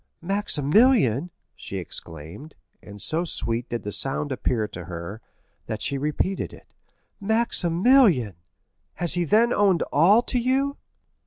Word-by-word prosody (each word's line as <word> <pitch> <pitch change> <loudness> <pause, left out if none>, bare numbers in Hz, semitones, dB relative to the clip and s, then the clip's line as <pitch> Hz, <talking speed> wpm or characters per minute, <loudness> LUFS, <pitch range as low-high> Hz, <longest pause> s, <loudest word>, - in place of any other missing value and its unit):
"Maximilian!" 180 - +2 0.3
she - - -7
exclaimed, 80 - -7 0.3
and 100 0 -12
so 160 - -1
sweet 120 -7 -3
did 120 - -4
the 105 - -4
sound 135 +5 -2
appear 120 -4 -1
to 90 -4 -9
her, 85 +5 -7 0.5
that 110 - -4
she 140 - -1
repeated 150 +6 -2
it—"Maximilian!—has 175 - -1
he 175 -1 0
then 225 +8 +3
owned 195 -5 +3
all 195 +10 +5
to 250 - -1
you?" 270 +3 0
155 Hz, 115 wpm, -24 LUFS, -, 0.5 s, all